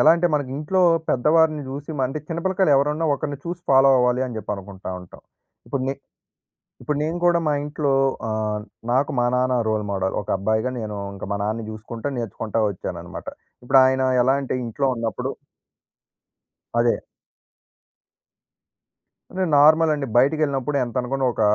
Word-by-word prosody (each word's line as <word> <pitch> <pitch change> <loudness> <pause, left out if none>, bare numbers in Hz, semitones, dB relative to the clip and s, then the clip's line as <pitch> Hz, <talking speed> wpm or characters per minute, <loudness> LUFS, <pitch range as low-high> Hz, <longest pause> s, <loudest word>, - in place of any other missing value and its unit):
ఎలా 155 - +7
అంటే 175 +1 +2
మనకింట్లో 150 +6 -1 0.3
పెద్దవారిని 155 +3 +3
జూసి, 140 +3 -6
మండి 135 +3 -1
చిన్నపిల్లకాయలు 185 0 +1
ఎవరన్నా 150 +4 +1
ఒకరిని 145 0 -4
చూసి 175 +1 -5
ఫాలో 135 0 +6
అవ్వాలి 125 0 +2
అని 120 -3 -6
జెప్పి 105 0 -4
అనుకుంటా 95 -1 -8
ఉంటాం. 90 - -15 0.5
ఇప్పుడు 135 - -2
నె 135 - -1 0.9
ఇప్పుడు 150 -1 -2
నేను 160 +3 -1
కూడా 175 -1 +4
మా 150 - +2
ఇంట్లో 150 0 -2 0.4
అహ్, 110 -1 -1 0.3
నాకు 130 +3 +2
మా 120 - +3
నాన్న 125 0 +2
రోల్ 110 -1 0
మోడల్. 95 -1 -1
ఒక 105 - -13
అబ్బాయిగా 110 +5 0
నేను 105 -2 -5 0.2
ఇంక 100 - -10
మా 100 - 0
నాన్నని 110 +2 -2
జూసుకుంటా 115 +4 -6
నేర్చుకుంటా 115 -1 -3
వచ్చాననమాట. 90 -3 -6 0.4
ఇప్పుడు 135 +2 +5
ఆయన 130 0 +2 0.2
ఎలా 130 +2 +3
అంటే 135 - -3
ఇంట్లో 120 +4 -2
ఉన్నప్పుడు 115 -2 -3 1.5
అదే. 120 0 +3 2.3
అంటే 190 0 -1
నార్మల్ 155 +2 +6
అండి. 145 -2 -3
బయటికెళ్ళినప్పుడు 140 0 +2
ఎంతనుకున్న 125 +3 -2
ఒక - - -3
130 Hz, 140 wpm, -23 LUFS, 110-150 Hz, 2.3 s, ఎలా